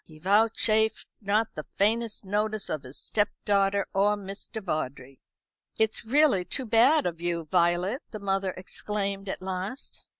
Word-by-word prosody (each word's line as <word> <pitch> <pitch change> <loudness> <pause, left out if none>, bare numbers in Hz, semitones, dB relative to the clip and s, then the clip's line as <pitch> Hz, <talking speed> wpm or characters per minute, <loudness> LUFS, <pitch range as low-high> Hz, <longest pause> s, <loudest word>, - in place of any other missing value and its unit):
He 155 - -16
vouchsafed 215 +4 +3 0.2
not 210 +2 +1
the 155 - -7
faintest 220 +1 +1
notice 210 +1 -1
of 155 - -2
his 130 +1 -9
stepdaughter 200 -1 0
or 205 +2 +3
Mr. 200 +3 -7
Vawdrey. 135 -8 -4 0.6
"It's 220 0 +1
really 265 -6 +4
too 260 +8 -2
bad 245 +7 +4
of 170 -1 -3
you, 170 -1 -2
Violet," 180 +7 +2
the 215 - -6
mother 195 -1 0
exclaimed 200 +1 -4
at 190 - -5
last. 190 +7 -5
200 Hz, 140 wpm, -27 LUFS, 180-220 Hz, 0.6 s, really